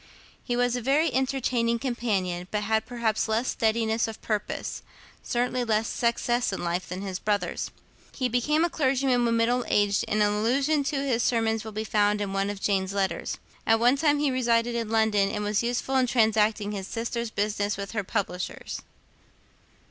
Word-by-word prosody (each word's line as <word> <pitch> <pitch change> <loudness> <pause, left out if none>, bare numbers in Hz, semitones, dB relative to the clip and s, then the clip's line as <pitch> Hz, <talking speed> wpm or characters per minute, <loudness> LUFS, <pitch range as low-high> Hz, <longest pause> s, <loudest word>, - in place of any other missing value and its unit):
He 245 - -1
was 245 0 +1
a 245 - -2
very 280 +7 +2
entertaining 255 -3 +1
companion, 200 -8 -2
but 210 -1 -1
had 220 +1 0
perhaps 235 -3 0
less 225 +3 0
steadiness 225 0 +1
of 220 -1 -7
purpose, 210 -2 -3 0.4
certainly 245 +1 -1
less 220 -1 +1
success 240 0 0
in 190 - -4
life, 175 +1 -2
than 185 +2 -5
his 190 -2 -4
brothers. 205 -1 -1 0.4
He 255 - -1
became 300 +7 +2
a - - -1
clergyman 260 -3 +2
when 230 0 +2
middle 240 +2 +2
aged; 205 -1 +2
and 210 0 +2
an 205 - +3
allusion 270 +8 +1
to 280 -1 -1
his 245 -4 +1
sermons 225 -2 +1
will 220 - -7
be 215 +1 -3
found 210 0 +2
in 200 -1 -3
one 195 +1 0
of 205 -1 -5
Jane's 195 -1 0
letters. 195 -1 -1 0.3
At 225 0 +4
one 245 +3 +5
time 295 0 +2
he 290 -1 +1
resided 240 -2 +1
in 230 -2 -2
London, 220 -3 +2
and 210 0 -3
was 210 0 +1
useful 245 +3 -1
in 255 -1 +3
transacting 220 -3 +2
his 195 -2 -5
sister's 235 0 -3
business 205 -1 -1
with 200 -1 -5
her 215 -2 -2
publishers. 185 -3 -4
225 Hz, 180 wpm, -26 LUFS, 205-245 Hz, 0.4 s, one